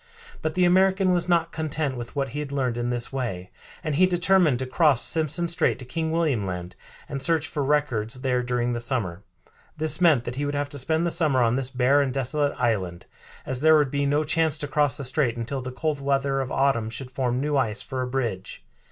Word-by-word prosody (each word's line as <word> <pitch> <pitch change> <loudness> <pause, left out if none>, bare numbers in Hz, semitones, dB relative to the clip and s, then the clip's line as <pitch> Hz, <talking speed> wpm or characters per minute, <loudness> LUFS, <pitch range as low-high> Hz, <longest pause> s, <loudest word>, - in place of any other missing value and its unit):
But 155 -1 -2
the 180 0 +3
American 190 +1 +3
was 175 0 0
not 170 -1 +2
content 155 -3 -2
with 120 +2 -8
what 140 -1 -1
he 145 +5 -5
had 145 -2 -5
learned 130 -4 -1
in 120 0 -2
this 120 +1 -2
way, 105 -9 -4 0.3
and 155 - -2
he 185 +6 +4
determined 180 -5 +3
to 130 - -3
cross 140 0 +3
Simpson 160 +1 0
Strait 170 0 +1
to 125 - -10
King 160 +6 -3
William 150 -11 0
Land, 90 -1 -6 0.3
and 140 -2 -4
search 160 +1 +2
for 145 - -3
records 130 -5 0
there 125 -2 +1
during 120 0 -1
the 120 - -2
summer. 110 -8 0 0.6
This 155 +3 0
meant 155 -9 +5
that 120 +1 -5
he 145 - -1
would 145 0 -2
have 145 0 -2
to 145 -1 -4
spend 160 +6 0
the 170 - 0
summer 150 -7 +2
on 115 0 +2
this 130 0 -1
bare 135 +2 +3
and 135 -2 0
desolate 140 +2 -1
island, 95 -8 -1 0.4
as 130 -1 -3
there 160 0 +6
would 145 -3 +1
be 140 0 0
no 145 +2 +2
chance 160 0 +1
to 150 - -4
cross 145 0 +1
the 140 - -5
strait 130 -2 0
until 125 +4 -3
the 130 0 -6
cold 150 +2 -2
weather 135 0 0
of 130 - -5
autumn 135 -5 +1
should 125 +2 -7
form 125 -1 -1
new 145 +1 -1
ice 115 -5 0
for 130 -1 -4
a 125 - -2
bridge. 120 -8 -4
140 Hz, 230 wpm, -25 LUFS, 125-155 Hz, 0.6 s, there